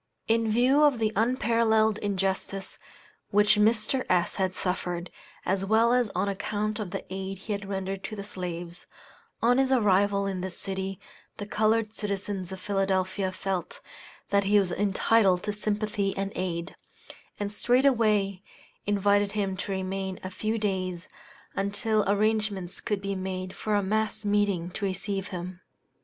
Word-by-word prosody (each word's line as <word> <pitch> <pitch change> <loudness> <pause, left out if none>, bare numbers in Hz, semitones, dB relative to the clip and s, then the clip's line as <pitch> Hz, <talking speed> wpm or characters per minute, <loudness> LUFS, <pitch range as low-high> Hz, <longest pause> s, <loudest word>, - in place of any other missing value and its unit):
In 225 -1 +2
view 255 +6 +4
of 290 -4 +5
the 220 -1 0
unparalleled 225 -2 +2
injustice 195 -1 -2 0.5
which 210 +1 +4
Mr. 220 +4 +3
S. 180 -1 +2
had 190 -2 0
suffered, 180 -1 -2 0.3
as 190 +1 +1
well 225 +4 +4
as 245 -3 +3
on 190 +3 +1
account 210 +2 -2
of 210 -4 -3
the 195 +2 -5
aid 190 0 -4
he 210 +3 -4
had 200 -1 -5
rendered 195 0 -3
to 215 - -5
the 200 - -5
slaves, 175 -3 -6 0.6
on 245 +2 +5
his 270 0 +2
arrival 200 -4 +3
in 190 -2 -2
this 185 -1 -5
city 190 -1 -4 0.4
the 205 - -5
colored 215 +1 +1
citizens 200 -3 -3
of 190 - -6
Philadelphia 190 0 0
felt 185 -1 -3 0.5
that 200 0 +3
he 205 +1 +4
was 195 -3 +3
entitled 195 -1 +3
to 210 - -1
sympathy 210 -1 -1
and 195 0 -2
aid, 170 -2 -3 0.6
and 205 0 -2
straightway 215 -5 +2 0.5
invited 205 0 +2
him 200 -3 -1
to 200 - -4
remain 190 0 -3
a 185 - -5
few 215 +4 -1
days, 185 -4 -2 0.5
until 205 +2 +1
arrangements 205 -3 0
could 205 -2 -2
be 200 0 -1
made 185 -1 -4
for 215 -1 -1
a 205 - +2
mass 215 +2 -1
meeting 205 -4 +1
to 200 - -6
receive 195 +1 -2
him. 180 -1 -6
200 Hz, 150 wpm, -27 LUFS, 190-215 Hz, 0.6 s, of